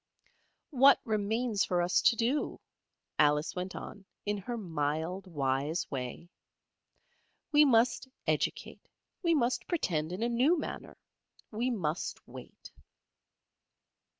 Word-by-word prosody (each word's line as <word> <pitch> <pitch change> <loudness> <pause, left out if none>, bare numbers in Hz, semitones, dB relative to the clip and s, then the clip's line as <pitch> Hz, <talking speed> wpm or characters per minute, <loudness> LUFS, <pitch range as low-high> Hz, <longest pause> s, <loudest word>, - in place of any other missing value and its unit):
"What 275 0 +6
remains 220 0 0
for 180 - 0
us 175 +1 +2
to - - +5
do?" 240 +6 -1 0.6
Alice 150 +1 +3
went 180 +1 -4
on 205 - -8 0.2
in 205 0 0
her 235 +5 -5
mild 160 0 -2
wise 145 0 -1
way. 130 +5 -5 1.2
"We 300 0 +7
must 240 0 +3 0.2
educate, - - -2 0.3
we 340 -3 +3
must 240 -3 0
pretend 165 - -1
in 185 +5 -3
a - - +2
new 260 +9 +3
manner, 300 - -6 0.5
we 235 +4 -1
must 175 -9 -3
wait." - - -12
205 Hz, 115 wpm, -31 LUFS, 160-245 Hz, 1.2 s, We